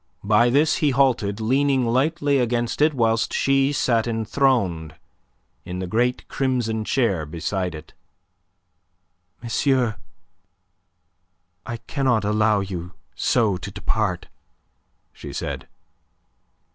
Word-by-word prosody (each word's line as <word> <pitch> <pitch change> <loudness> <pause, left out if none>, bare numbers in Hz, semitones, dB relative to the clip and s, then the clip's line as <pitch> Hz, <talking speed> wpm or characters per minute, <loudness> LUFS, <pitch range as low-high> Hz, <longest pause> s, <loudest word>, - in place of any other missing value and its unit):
By 105 +4 +4
this 145 +5 +3
he 150 - +2
halted, 125 -6 +1
leaning 130 +3 +2
lightly 140 +4 +1
against 120 +1 -1
it 155 0 +4
whilst 115 -2 +1
she 135 0 +2
sat 120 -5 +1
enthroned 110 - 0 0.7
in 90 +1 -6
the 95 - -3
great 120 +7 0
crimson 120 -5 -1
chair 110 - 0
beside 85 +3 -3
it. 75 +1 -11 1.5
"Monsieur, 120 -2 +1 1.7
I 120 - -4
cannot 120 -2 0
allow 105 0 +2
you 90 -2 -6 0.2
so 110 -6 +1
to 100 +2 -7
depart," 95 -2 -2 0.9
she - - -9
said. - - -5
115 Hz, 105 wpm, -23 LUFS, 100-130 Hz, 1.7 s, By